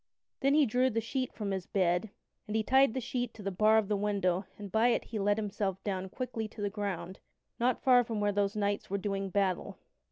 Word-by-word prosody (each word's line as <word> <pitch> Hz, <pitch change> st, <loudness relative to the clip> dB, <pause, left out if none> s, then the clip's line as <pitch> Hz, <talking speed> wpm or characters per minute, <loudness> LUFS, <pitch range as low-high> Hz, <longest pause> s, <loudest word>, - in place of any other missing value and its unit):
Then 275 Hz, +1 st, +3 dB
he 300 Hz, -1 st, +5 dB
drew 250 Hz, +2 st, +2 dB
the 225 Hz, -2 st, 0 dB
sheet 255 Hz, +3 st, -2 dB
from 205 Hz, -3 st, -4 dB
his 190 Hz, -2 st, -3 dB
bed, 180 Hz, +1 st, +1 dB, 0.4 s
and 210 Hz, -, -3 dB
he 220 Hz, -, +2 dB
tied 265 Hz, +1 st, +4 dB
the -, -, 0 dB
sheet 245 Hz, 0 st, -3 dB
to 210 Hz, -, -10 dB
the 195 Hz, -, -2 dB
bar 215 Hz, +4 st, +4 dB
of 220 Hz, -2 st, +2 dB
the 210 Hz, -, +1 dB
window 195 Hz, -2 st, 0 dB
and 205 Hz, -2 st, -8 dB
by 225 Hz, +2 st, +4 dB
it 245 Hz, -, +2 dB
he 220 Hz, -, -5 dB
let 205 Hz, +1 st, +2 dB
himself 200 Hz, -3 st, -2 dB, 0.3 s
quickly 230 Hz, -1 st, -4 dB
down -, -, -21 dB
to 215 Hz, -, -7 dB
the 205 Hz, -, -1 dB
ground 190 Hz, -3 st, -4 dB, 0.4 s
not 245 Hz, +1 st, +1 dB
far 250 Hz, -2 st, +6 dB
from 225 Hz, -2 st, -3 dB
where 205 Hz, 0 st, +2 dB
those 200 Hz, 0 st, 0 dB
knights 205 Hz, -1 st, -1 dB
were 200 Hz, -, 0 dB
doing 195 Hz, 0 st, -2 dB
battle. 190 Hz, -2 st, -1 dB
210 Hz, 230 wpm, -31 LUFS, 195-230 Hz, 0.4 s, far